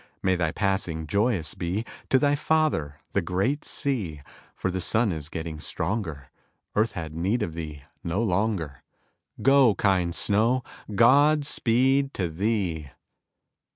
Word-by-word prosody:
May 95 -1 +3
thy 85 -3 0
passing 95 -5 -1
joyous 100 - +1
be 90 +6 -3 0.2
To 130 - +5
thy 145 +1 +2
father, 150 - 0 0.2
the - - +1
great 100 - -1
sea, 105 - -2 0.3
For 95 - -2
the 95 0 -2
sun 110 +3 +2
is 80 -3 -5
getting 80 -1 -5
stronger; 80 - -3 0.4
Earth 110 +2 +2
hath 80 -3 -5
need 95 +9 -1
of 85 - -4
thee 75 -4 -7 0.2
no 95 +7 -1
longer; 95 - -1 0.6
Go, 135 -5 +5
kind 90 -4 +1
snow, 115 +5 +2 0.3
God 145 +6 +5
speed 135 +2 +2
to 90 -3 -1
thee! 85 -4 -2
100 Hz, 135 wpm, -26 LUFS, 80-120 Hz, 0.6 s, To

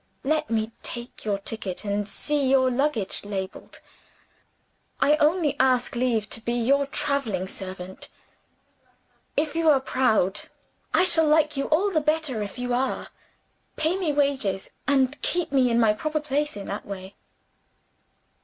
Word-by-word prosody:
Let 310 +2 0
me 220 0 0
take 240 -1 -6
your 205 -2 0
ticket 200 -1 -4
and 205 0 -1
see 285 +5 0
your 260 -1 +4
luggage 250 -6 -1
labeled: 195 -2 -6 1.2
I 295 - +5
only 305 0 +2
ask 255 -2 +2
leave 235 -3 +1
to 225 - -2
be 235 +1 -2
your 270 +4 +2
traveling 275 -10 -1
servant. 190 -1 -7 1.3
If 300 +1 0
you 330 -1 +3
are 285 -3 +6
proud 220 -7 +1 0.5
I - - +4
shall 335 -3 +5
like 300 0 +3
you 275 - -1
all 375 +7 +2
the 315 -4 +2
better, 305 -6 0
if 205 +3 -5
you 245 0 -2
are 260 +2 -1 0.7
pay 320 +3 +1
me 365 -5 0
wages, 275 -10 0 0.2
and 270 0 +2
keep 350 -4 -1
me 260 -3 +3
in 235 0 +2
my 220 -2 +4
proper 310 +7 -2
place 295 -2 -2
in 200 - -6
that 200 - -5
way." 190 -1 -7
260 Hz, 150 wpm, -25 LUFS, 215-300 Hz, 1.3 s, are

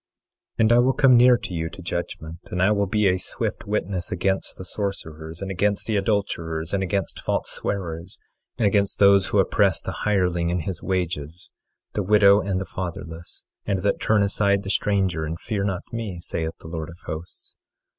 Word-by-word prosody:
24:5 - - -37
And 110 +1 +4
I 120 - +6
will 130 +2 +4
come 130 -2 +5
near 125 +1 +7
to 95 - -7
you 80 -1 -2
to 95 - -11
judgment; 85 -1 -4
and 90 - -3
I 95 +3 +4
will 100 -1 +2
be 105 +1 +2
a 90 0 +3
swift - - -3
witness 100 -4 -2
against 95 0 -1
the 95 - -8
sorcerers, 85 -4 -5
and 95 - -4
against 100 +2 0
the 110 - -1
adulterers, 90 -5 -1
and 100 - +1
against 95 +1 -2
false - - -1
swearers, 85 -2 -4 0.4
and 115 - +1
against 100 -1 +2
those 100 -1 +5
that - - +1
oppress 95 -2 +3
the 95 - -5
hireling 90 -3 +1
in 90 0 0
his 85 +1 -5
wages, 85 -3 -3 0.4
the 105 - 0
widow 100 0 +6
and 95 -1 -1
the 95 - -4
fatherless, 85 -1 -7 0.2
and 95 -2 0
that 100 - +1
turn 105 -2 +3
aside 100 0 +2
the 95 - -2
stranger, 95 -7 +1
and 80 +1 -4
fear 105 -4 -2
not 100 -1 -2
me, 110 -6 -4
saith 80 -1 -4
the - - -10
Lord 80 -1 -5
of 85 - -11
Hosts. 80 +3 -8
95 Hz, 195 wpm, -24 LUFS, 85-100 Hz, 0.4 s, near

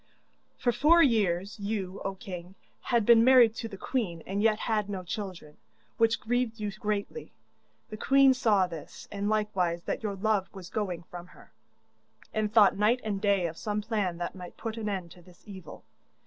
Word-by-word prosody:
'For 245 - +1
four 330 +8 +5
years, 205 - +1
you, 200 -2 -4
O 195 0 -3
king, 180 -1 -9 0.3
had 235 -4 +1
been 230 0 +7
married 250 -3 +6
to 225 - -4
the 200 -3 -9
queen 190 -8 -3
and 200 +2 -2
yet 215 -1 +3
had 210 -3 -1
no 190 -2 -4
children, 180 -5 -7 0.4
which 225 0 +3
grieved 240 0 -1
you 210 -1 -3
greatly. 210 - -4 0.6
The 215 - -6
queen 270 +3 +5
saw 215 -7 +3
this, 165 -4 -9
and 205 0 -2
likewise 190 -6 0
that - - -3
your 210 -3 -3
love 200 -1 0
was 185 -2 -10
going 185 -6 -3
from 175 +1 -10
her, - - -18 0.8
and 215 -1 -1
thought 215 -3 +6
night 225 +5 +2
and 205 -3 -3
day 200 -3 +2
of 165 -1 -4
some 210 -1 -2
plan 205 -6 -1
that 175 0 -4
might 180 -2 -10
put 225 -2 -5
an 220 -2 -3
end 185 -4 -4
to 180 - -14
this 175 0 -20
evil. 190 -5 -11
205 Hz, 185 wpm, -28 LUFS, 185-225 Hz, 0.8 s, been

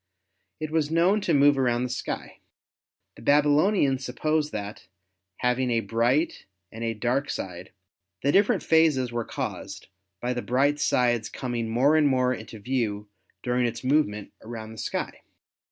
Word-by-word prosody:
It 155 -1 -4
was 155 -2 +1
known 175 +6 +3
to - - -1
move 140 0 +5
around 120 -2 +1
the 125 - -2
sky. 120 - -5 0.8
The - - -12
Babylonians 145 -1 +3
supposed 150 +4 -1
that, 105 -2 -6 0.5
having 125 +1 0
a 115 -1 +1
bright 120 - 0 0.2
and 115 +1 -7
a 115 -1 -1
dark 125 +6 -1
side, 90 -1 -6 0.5
the 140 - +3
different 200 +3 +3
phases 155 -6 +3
were 120 0 -2
caused - - -6 0.3
by 125 +3 -1
the 120 - -3
bright 140 +5 +1
side's 120 -3 +1
coming 120 -3 -3
more 130 +7 +3
and 155 -2 +4
more 130 -2 +2
into 110 -1 -8
view 105 -3 -2 0.3
during 125 -1 +1
its 115 +1 -5
movement 130 -7 +1
around 110 -1 -8
the 110 - -10
sky. - - -4
125 Hz, 155 wpm, -26 LUFS, 115-145 Hz, 0.8 s, move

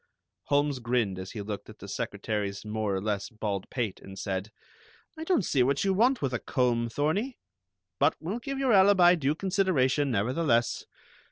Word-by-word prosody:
Holmes 145 -1 +1
grinned 120 -6 0
as 95 0 -7
he 105 -3 -5
looked 105 0 -6
at - - -12
the - - -10
secretary's 105 -2 -3
more 105 -2 -1
or - - 0
less 105 -2 -2
bald 105 -4 -4
pate, 115 -7 -3
and 95 0 -11
said: 95 +1 -3 0.7
"I 320 - -6
don't 325 - +1
see 135 - +2
what 135 +3 +2
you 195 -1 +2
want 240 - +2
with 130 -2 -1
a 120 - 0
comb, 120 -2 0
Thorney. 185 - -1 0.6
But 145 +3 +3
we'll 190 +9 -4
give 275 +3 -5
your 265 -3 +2
alibi 190 -3 +6
due 150 -3 0
consideration, 165 -8 +1
nevertheless. 120 +2 +1
130 Hz, 175 wpm, -28 LUFS, -, 0.7 s, alibi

